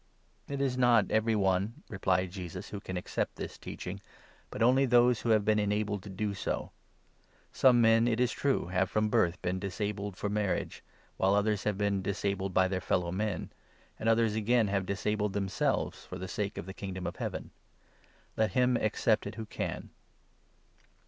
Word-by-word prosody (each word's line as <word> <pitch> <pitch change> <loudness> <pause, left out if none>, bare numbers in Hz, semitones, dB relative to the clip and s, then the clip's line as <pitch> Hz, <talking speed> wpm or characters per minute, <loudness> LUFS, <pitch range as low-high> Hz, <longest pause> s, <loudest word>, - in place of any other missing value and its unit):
" - - -38
It 140 - -3
is 130 -2 0
not 120 -5 +4
every 110 +1 +2
one, 95 +2 0
"replied 95 -2 0
Jesus, 90 -3 -7
"who 100 - -5
can 95 -2 -5
accept 90 - -2
this - - -6
n - - -16
teaching, - - -6 0.5
but - - -2
only 130 +3 +4
those 120 -1 +4
who 120 - -2
have 110 -2 +4
been 105 0 +3
enabled 105 -1 0
to 100 - -10
do 100 +2 -2
so. 100 - -3 0.8
Some 125 -2 +5
men, 115 +1 +5
it 115 -1 +1
is 125 -1 +2
true, 140 -8 0
have 95 0 +1
from 105 0 +1
birth 85 -4 +2
been 90 +1 -1
disabled 100 +1 -3
for - - -2
12 - - -3
marriage, 105 -2 -1 0.3
while 95 +1 +3
others 105 -1 +1
have 105 -2 0
been 100 -1 +1
disabled 100 0 -2
by 95 0 +3
their 95 0 -2
fellow 90 -1 0
men, 105 +1 -2 0.5
and 115 - +1
others 115 -1 +3
again 110 0 +2
have 95 -2 -1
disabled 105 +1 -1
themselves 100 -1 -1
for 90 - -8
the 95 0 -5
sake 100 +2 -3
of - - -5
the 95 - -7
Kingdom 95 -2 -6
of - - -4
Heaven. - - -4 0.8
Let 110 -3 +1
him 125 -1 +3
accept 110 -1 +1
it 105 - -7
who 110 -1 -5
can." - - -5
105 Hz, 190 wpm, -30 LUFS, 95-110 Hz, 0.8 s, Some